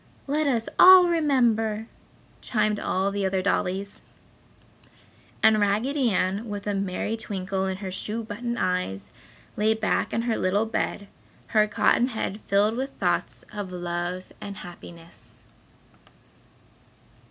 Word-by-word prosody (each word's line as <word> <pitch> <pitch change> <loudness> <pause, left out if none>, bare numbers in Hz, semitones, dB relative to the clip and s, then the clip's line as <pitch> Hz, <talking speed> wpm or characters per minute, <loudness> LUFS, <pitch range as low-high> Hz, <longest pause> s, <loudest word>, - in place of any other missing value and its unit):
"Let 295 +2 0
us 235 -5 0
all 370 -1 +9
remember," 240 -10 +1 0.6
chimed 215 -2 0
all 190 +2 0
the 200 0 -2
other 190 -1 0
dollies. 200 0 -1 1.4
And 220 -1 +6
Raggedy 235 +6 +1
Ann, 195 +3 -1
with 205 -1 -5
a 205 - -1
merry 195 +2 -2
twinkle 190 -3 -3
in 190 0 -3
her 190 -1 -6
shoe 215 +4 -3
button 235 +3 -4
eyes, 140 - -2 0.4
lay 220 +1 +2
back 220 -1 0
in 230 - -1
her 235 -2 0
little 200 +4 +1
bed, 215 -2 -3 0.4
her 215 -1 +3
cotton 235 +3 +2
head 220 -4 -4
filled 205 +3 +2
with 265 +2 -2
thoughts - - -1
of 205 -3 -5
love 175 +1 -4
and 200 -1 -7
happiness. 170 -1 -13
210 Hz, 130 wpm, -25 LUFS, 190-225 Hz, 1.4 s, all